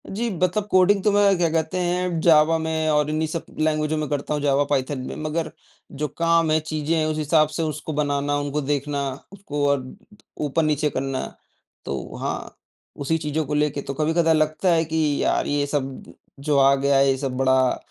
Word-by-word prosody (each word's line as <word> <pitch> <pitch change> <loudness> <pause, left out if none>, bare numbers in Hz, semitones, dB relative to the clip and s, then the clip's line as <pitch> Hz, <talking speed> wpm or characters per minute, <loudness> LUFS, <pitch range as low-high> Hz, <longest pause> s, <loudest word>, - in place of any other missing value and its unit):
जी, 235 +4 -1
मतलब 185 +4 +1
कोडिंग 190 +1 +4
तो 210 - +3
मैं 200 -1 +4
क्या 170 -1 +2
कहते 160 +2 -1
हैं 180 -1 -1
जावा 160 0 +5
में 160 0 -1
और 150 -1 +2
इन्हीं 155 +1 -1
सब 165 +1 -5
लैंग्वेजो 155 0 0
में 155 -1 -2
करता 145 0 -2
हूँ 150 - -2
जावा, 140 0 +2
पाइथन 140 -1 -1
में। - - -6
मगर 155 +1 -2 0.5
जो 150 - +1
काम 165 -1 +3
है, 155 - +3
चीज़ें 155 +1 -2
हैं 155 - +1
उस 155 0 -2
हिसाब 155 0 +3
से 165 - 0
उसको 155 0 -4
बनाना, 145 -1 0
उनको 145 +1 -2
देखना, 145 0 -1 0.3
उसको 170 -8 -5
अ, 140 0 +3 0.7
ऊपर-नीचे 150 0 +1
करना, 135 -1 -3 0.6
तो 70 - -5
हाँ, - - -5 0.4
उसी 145 +3 -1
चीज़ों 155 0 -2
को 150 - -4
लेके 150 -1 0
तो 140 - -5
कभी-कदा 160 +3 +2
लगता 155 +4 +1
है 165 0 +2
कि 160 +1 -2 0.2
यार, - - +1
ये 145 0 0
सब 135 -2 -3 0.4
जो 145 0 0
आ 135 0 +6
गया 140 0 +2
है, 135 0 +4
ये 135 - -1
सब 130 -1 -3
बड़ा 130 0 +3
अ, - - -3
155 Hz, 200 wpm, -23 LUFS, 145-165 Hz, 0.7 s, आ